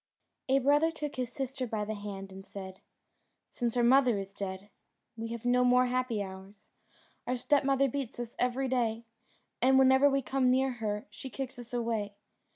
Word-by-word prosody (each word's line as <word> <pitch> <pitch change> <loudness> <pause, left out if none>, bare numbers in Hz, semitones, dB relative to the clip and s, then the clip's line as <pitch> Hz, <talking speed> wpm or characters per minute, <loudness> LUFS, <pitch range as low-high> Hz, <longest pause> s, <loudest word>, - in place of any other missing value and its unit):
A 265 - +5
brother 290 +4 +4
took 300 -3 -5
his 250 -2 -2
sister 265 -1 -4
by 215 -2 -2
the 215 - -3
hand 200 -2 -7
and 190 0 -10
said, 190 -1 -9 0.7
"Since 240 -1 -2
our 240 - +3
mother 250 -2 +5
is 195 0 -6
dead 195 0 -6 0.4
we 225 0 -5
have 230 0 -6
no 250 +1 +4
more 250 0 +5
happy 250 -4 -1
hours: 190 +1 -11 0.6
our 250 +1 0
stepmother 275 +1 +2
beats 265 -2 -4
us 240 -1 -5
every 250 +2 +1
day, 235 -3 0 0.6
and 265 +2 +5
whenever 265 +1 +6
we 275 -1 +1
come 260 0 +1
near 265 +1 +3
her 210 -1 -2
she 210 +6 -8
kicks 265 -1 -6
us 240 -1 -10
away. 225 -4 -2
245 Hz, 175 wpm, -30 LUFS, 210-265 Hz, 0.7 s, whenever